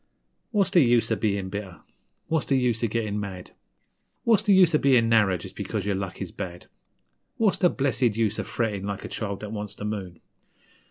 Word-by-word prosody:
What's 200 -4 +1
the 180 - +5
use 120 -3 +3
of - - +1
bein' 100 -3 -1
bitter? 100 -3 -7 0.4
What's 160 -3 -1
the 135 - +3
use 120 -3 +1
of 115 - +1
gettin' 105 -2 -2
mad? 95 -3 -7 0.7
What's 225 -3 +4
the 215 -1 +1
use 185 -3 +6
of 150 - +3
bein' 125 -4 +4
narrer 105 -5 +4
just - - -10
because - - -3
yer 100 - 0
luck 95 -2 -4
is - - -8
bad? 90 -3 -7 0.7
What's 215 -4 +2
the 180 - +5
blessed 130 -6 0
use 110 -3 +1
of - - -4
frettin' 105 -4 -2
like 100 0 -4
a - - -4
child 100 -3 -4
that 105 -1 -6
wants 105 -2 -5
the 105 - -7
moon? 95 -5 -5
110 Hz, 205 wpm, -26 LUFS, 100-135 Hz, 0.7 s, use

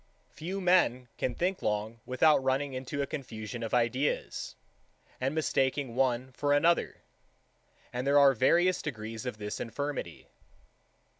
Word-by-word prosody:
4. - - -33
Few 180 +6 -4
men 175 -10 +3
can 125 - -1
think 185 +2 -1
long 105 +2 -2
without 135 +3 +4
running 135 +1 0
into 130 +2 -3
a - - -1
confusion 120 -4 -6
of 115 - -4
ideas, 125 +4 -1 0.6
and 135 +3 -1
mistaking 135 -4 0
one 130 0 0
for 145 +3 0
another; 165 +4 +2 0.9
and 125 +2 -2
there 140 +1 +5
are 140 -1 +7
various 175 +9 +3
degrees 115 -3 -5
of 125 - -4
this 105 -1 -5
infirmity. 145 +5 -4
130 Hz, 140 wpm, -30 LUFS, 120-145 Hz, 0.9 s, are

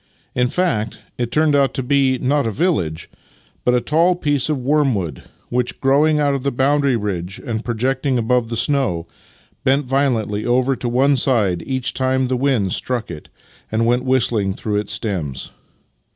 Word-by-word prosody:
In 125 0 +2
fact, 120 -10 -1 0.2
it 120 -1 -1
turned 155 -1 +3
out 140 -1 +2
to 130 - -1
be, 135 0 +2
not 140 +1 +1
a - - +1
village, 105 - -1 0.6
but 125 - +3
a - - +3
tall 165 +8 +2
piece 145 -5 0
of 150 -3 0
wormwood, 125 - 0 0.3
which, 125 0 -1
growing 150 +3 +3
out 145 -1 +2
of 135 -2 -3
a 140 - +1
boundary 140 +1 +2
ridge 95 -4 -3
and 115 -1 -3
projecting 130 +3 0
above 120 0 +1
the 115 - -3
snow, 125 - 0 0.6
bent 135 +2 +2
violently 120 -6 0
over 130 +2 +2
to 125 - -3
one 135 +3 +3
side 105 -9 +2
each 130 -2 -1
time 130 0 +1
that 125 - -1
the 130 - 0
wind 125 -8 +1
struck 120 -6 -2
it 75 -3 -9 0.4
and 110 +1 +1
went 120 +2 +2
whistling 120 -7 +1
through 105 -2 -2
its 105 -1 -2
stems. 80 - -3
125 Hz, 175 wpm, -19 LUFS, 110-140 Hz, 0.6 s, turned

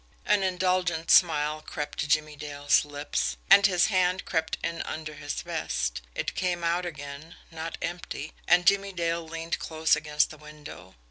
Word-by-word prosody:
An 210 -1 +3
indulgent 180 -3 0
smile 155 -3 +4
crept 150 -1 -6
to 150 - -1
Jimmie 155 0 +1
Dale's 145 -1 +1
lips 145 0 -2
and 200 +1 +9
his 180 -2 +3
hand 185 -2 +1
crept 160 -2 -1
in 170 0 -2
under 155 -1 -5
his 145 -1 -5
vest. - - -2
It - - -2
came 180 -2 -1
out 175 +1 0
again 150 +1 -8 0.2
not 165 0 -6
empty 160 -3 -5
and 175 0 +5
Jimmie 200 +1 +3
Dale 170 -1 -1
leaned 165 +1 -4
close 160 -1 +2
against 150 0 0
the 155 - -12
window. 150 -11 -12
160 Hz, 160 wpm, -27 LUFS, 150-180 Hz, 0.2 s, and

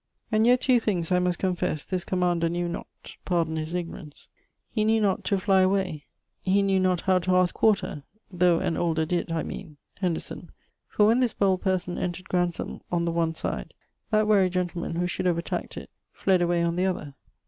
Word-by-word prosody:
'And 220 +1 +3
yet 250 +1 +5
two 255 -2 +4
things 185 -7 -1
(I 180 - +4
must 180 -1 0
confess) 175 -5 -1
this 185 -2 -2
commander 175 -3 +1
knew 175 +1 -1
not, 170 - -5 0.4
pardon 165 -3 0
his 160 +2 -3
ignorance, 170 -3 -7 0.4
he 215 - 0
knew 220 +1 +3
not 200 -3 +1
to 200 - +1
flie 190 0 +3
away 185 -6 0 0.3
he 195 +2 +2
knew 195 -1 +2
not 185 -2 +1
how 185 -1 +3
to 185 +1 +1
aske 180 -1 +3
quarter 210 -8 +1 0.3
though 180 -2 +3
an 165 - -1
older 160 -2 +1
did, 170 +1 -2
I 165 -1 -1
meane... 160 -7 -8 0.2
Henderson; 180 -4 -3 0.4
for 210 - +3
when 225 +4 +4
this 250 -3 +1
bold 190 -2 +1
person 185 -2 -1
entred 180 +1 -4
Grantham 175 -2 -1
on 170 -1 +1
the 170 - 0
one 165 -1 0
side, - - -4 0.3
that 215 0 +3
wary 200 -3 +4
gentleman, 175 -2 -2
who 175 +1 0
should 180 +1 -2
have 175 -2 +2
attaqued 170 - -4
it, - - -8 0.2
fled 190 -2 +1
away 175 0 +2
on 170 0 0
the 185 +1 +2
other. 155 -6 -3
180 Hz, 200 wpm, -26 LUFS, 170-190 Hz, 0.4 s, yet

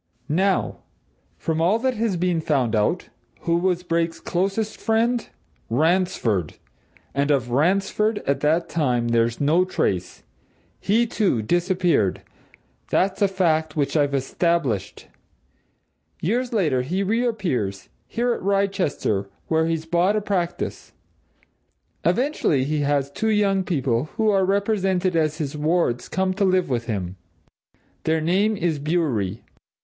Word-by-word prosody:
Now, 190 +6 +1 0.6
from 160 0 -1
all 185 +6 +3
that 260 +2 0
has 220 -5 -1
been 175 -1 0
found 130 -8 +1
out, 110 +12 0 0.3
who 170 0 +1
was 180 0 0
Brake's 165 -1 -1
closest 195 +4 -1
friend? 230 +2 +1 0.4
Ransford! 140 - +1 0.6
And 140 +1 0
of 130 -4 +1
Ransford, 195 - +1
at 140 0 +1
that 160 +4 +1
time, 125 -7 0
there's 115 0 +1
no 155 +5 +3
trace. 95 - -2 0.6
He, 225 +4 +2
too, 200 - 0
disappeared 175 - +1 0.7
that's 195 +2 +1
a 200 - +5
fact 165 -5 0
which 145 -1 0
I've 145 -2 +2
established. 135 - -1 1.1
Years 240 +8 -1
later, 155 - +1
he 180 +10 -1
reappears 190 - -1 0.2
here 240 +1 0
at - - -5
Wrychester, 190 - 0 0.2
where 160 0 +2
he's 165 -1 -2
bought 175 +5 +2
a 215 - +1
practice. 180 -4 -3 1.1
Eventually 250 - +1
he 150 +2 -1
has 140 -1 0
two 220 +9 -1
young 200 -3 +2
people, 135 -8 0
who 220 -1 +3
are 195 -2 +3
represented 195 -2 +1
as 155 -2 +1
his 150 -2 -4
wards, 150 -5 0
come 190 0 0
to 200 +2 -1
live 185 -3 +2
with 120 -2 -1
him. 95 -5 -3 0.9
Their 160 0 +2
name 195 +7 +1
is 170 -6 -1
Bewery. 140 - -1
170 Hz, 130 wpm, -23 LUFS, 140-195 Hz, 1.1 s, a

